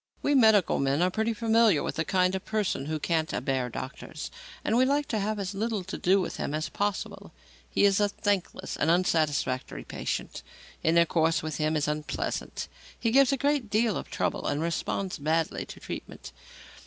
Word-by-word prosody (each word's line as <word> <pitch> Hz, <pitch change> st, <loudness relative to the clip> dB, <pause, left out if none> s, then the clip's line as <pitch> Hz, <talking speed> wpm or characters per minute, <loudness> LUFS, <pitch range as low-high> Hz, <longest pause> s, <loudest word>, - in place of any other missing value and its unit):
We 290 Hz, -, +2 dB
medical 220 Hz, -, +5 dB
men 140 Hz, +4 st, +2 dB
are 185 Hz, -, +2 dB
pretty 220 Hz, +3 st, 0 dB
familiar 225 Hz, -5 st, +3 dB
with -, -, -2 dB
the 160 Hz, -, +1 dB
kind 185 Hz, +1 st, +2 dB
of 190 Hz, -, -3 dB
person 205 Hz, -10 st, -1 dB
who 155 Hz, 0 st, -1 dB
"can't 160 Hz, +1 st, 0 dB
abear 130 Hz, -1 st, -1 dB
doctors," 140 Hz, +6 st, -7 dB, 0.3 s
and 220 Hz, -, +2 dB
we 250 Hz, -, +5 dB
like 285 Hz, +2 st, +1 dB
to 220 Hz, -, 0 dB
have 215 Hz, +2 st, -1 dB
as 200 Hz, -1 st, -3 dB
little 215 Hz, 0 st, -2 dB
to -, -, -6 dB
do 190 Hz, +2 st, +3 dB
with 185 Hz, -, -3 dB
him 145 Hz, -, -2 dB
as 155 Hz, 0 st, -2 dB
possible. 205 Hz, -1 st, -3 dB, 0.4 s
He -, -, +3 dB
is 200 Hz, 0 st, +4 dB
a 205 Hz, -1 st, +3 dB
thankless 200 Hz, -2 st, -2 dB
and 155 Hz, -, +1 dB
unsatisfactory 155 Hz, -7 st, +1 dB
patient. -, -, -4 dB, 0.4 s
Intercourse 165 Hz, -1 st, +3 dB
with 155 Hz, -3 st, -3 dB
him 155 Hz, +1 st, 0 dB
is 150 Hz, -1 st, 0 dB
unpleasant, 150 Hz, 0 st, -3 dB, 0.3 s
he 230 Hz, -, +1 dB
gives 275 Hz, +1 st, +5 dB
a 275 Hz, -, +1 dB
great 280 Hz, -4 st, 0 dB
deal 215 Hz, -1 st, +2 dB
of -, -, -5 dB
trouble -, -, -1 dB
and 145 Hz, -, 0 dB
responds 170 Hz, +3 st, -2 dB
badly 160 Hz, +2 st, 0 dB
to -, -, -10 dB
treatment. -, -, -8 dB
185 Hz, 185 wpm, -28 LUFS, 155-220 Hz, 0.4 s, medical